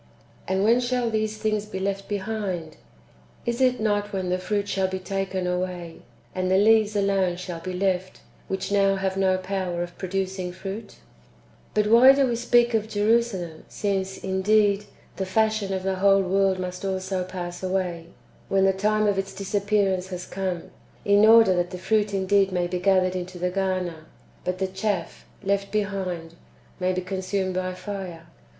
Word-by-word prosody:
^ - - -30 0.4
And 190 +1 +1
when 230 +3 +5
shall 245 -1 0
these 215 0 -1
things 215 -1 -1
be 200 - -6
left 195 +1 -2
be 205 - -1
hind? 190 -6 -4 0.7
Is 235 +2 -1
it 255 -1 +3
not 205 -1 0
when 190 -2 -2
the 180 0 0
fruit 205 +2 -1
shall 190 -1 0
be 190 0 -3
taken 190 0 -3
away, 180 -2 -3 0.4
and 185 0 -1
the 190 - +4
leaves 215 +1 +4
alone 195 -3 +2
shall 180 -2 -6
be 185 +2 -5
left, 185 0 -1 0.3
which 190 +1 -3
now 195 -1 +3
have 190 0 -1
no 190 -1 +2
power 185 -2 -2
of 175 0 -8
pro 185 - -4
ducing 190 -1 -2
fruit? 195 +4 -7 0.8
3. 210 - +4
But - - -2
why 255 +4 +9
do 275 0 +3
we 240 -2 0
speak 240 0 +3
of 220 -1 0
Jerusalem, 205 -6 0
since, 195 -2 -2
indeed, 200 +2 +2 0.3
the 190 - -1
fashion 215 0 +1
of 190 -1 -2
the 190 0 -1
whole 195 0 +4
world 190 0 +2
must 180 0 -5
also 190 -1 -2
pass 175 -1 -6
away, 185 -3 -2 0.4
when 195 0 +3
the 190 - +4
time 215 +2 +1
of 200 -2 +2
its 195 - -4
disappearance 200 -1 0
has 180 -1 -6
come, 185 -3 -4 0.3
in 205 +1 +5
order 225 -3 +7
that 175 0 0
the 180 - -6
fruit 205 +3 +1
indeed 195 0 +2
may 180 -1 0
be 180 +1 -2
gathered 185 -1 +3
into 180 0 -5
the 180 +1 -1
garner, 185 -4 -2 0.4
but 180 0 -1
the 190 - 0
chaff, 190 -2 -3 0.2
left 200 0 0
behind, 190 -5 -2 0.5
may 185 0 +1
be 185 0 -1
consumed 190 0 -2
by 185 0 -2
fire 185 -4 -6
190 Hz, 180 wpm, -25 LUFS, 185-205 Hz, 0.8 s, why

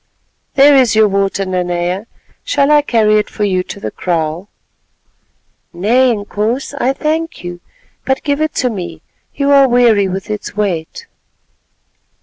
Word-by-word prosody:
"There 280 +1 +6
is 250 -5 +4
your 220 -1 +5
water, 195 0 -1
Nanea, 180 +2 -2 0.4
shall 295 - +1
I 300 0 +6
carry 215 -6 +2
it 210 - -3
for 210 - -4
you 185 -3 +1
to - - -8
the - - -5
kraal?" 170 +2 -3 1.2
"Nay, 235 +9 +2
Inkoos, 220 +5 -3
I 255 - +2
thank 320 - -3
you, 175 0 -7 0.4
but 265 0 -1
give 285 0 -1
it 310 -1 -1
to 250 -1 0
me, 185 -5 -7 0.3
you 280 0 +1
are 275 -1 +6
weary 235 -5 +4
with 190 +3 -5
its 210 -1 -6
weight." 180 -6 -3
215 Hz, 145 wpm, -15 LUFS, 190-265 Hz, 1.2 s, There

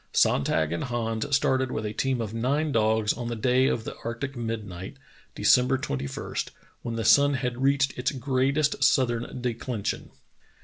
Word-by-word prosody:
Sonntag 75 +2 +2
and 85 - -2
Hans 115 +1 -1
started 130 -2 +1
with 110 - -3
a 105 - -3
team 130 +1 0
of 110 -1 -4
nine 140 +7 0
dogs 110 -2 +2
on 120 0 -5
the 120 - -3
day 125 +3 +2
of 115 - -1
the - - -6
arctic 120 +4 -4
midnight, 110 -3 -5 0.4
December 125 +1 +4
21, 70 - -5 0.5
when 115 -1 -4
the 115 - -2
sun 145 0 +5
had 125 -1 -3
reached 140 0 +2
its 125 - +1
greatest 140 +2 0
southern 125 -2 +1
declension. 115 -3 -3
120 Hz, 160 wpm, -26 LUFS, 110-135 Hz, 0.5 s, sun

